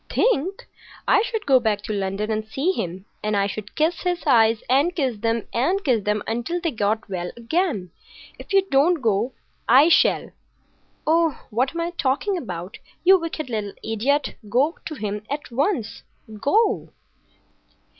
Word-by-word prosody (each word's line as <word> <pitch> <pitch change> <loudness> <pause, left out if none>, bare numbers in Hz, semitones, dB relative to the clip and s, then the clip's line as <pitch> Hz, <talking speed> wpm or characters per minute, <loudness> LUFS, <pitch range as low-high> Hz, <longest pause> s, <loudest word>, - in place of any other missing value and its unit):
"Think! 385 - +1 0.4
I 405 - +5
should 445 -2 -3
go 265 -2 +5
back 215 -3 0
to 215 - -3
London 200 +2 -2
and 215 0 -1
see 270 +11 -1
him 185 - -4 0.2
and 210 -1 0
I 200 - +2
should 205 +1 -6
kiss 320 +3 +1
his 355 -2 -1
eyes 225 -5 +4
and 280 +8 +2
kiss 260 -8 0
them 230 0 0
and 360 +12 +1
kiss 240 - +2
them 210 0 0
until 240 +10 -2
they 335 -2 -1
got 215 -2 -1
well 180 -3 -4
again! 235 - -1 0.5
If - - -11
you 390 -1 +4
don't 305 +5 +4
go 225 +3 +1 0.4
I 270 +7 +7
shall. - - +3 0.7
Oh, 325 -2 +2
what 255 +8 0
am 335 - -1
I 340 +1 -2
talking 340 +6 0
about? 180 - -6 0.2
You 380 +1 +7
wicked 325 -3 -4
little 215 -4 -3
idiot! 255 +7 0 0.2
Go 275 - +1
to 310 - -6
him 210 -4 -4
at 285 -2 -5
once. 270 - -1 0.4
Go!" 415 - +1
255 Hz, 165 wpm, -23 LUFS, 215-335 Hz, 0.7 s, I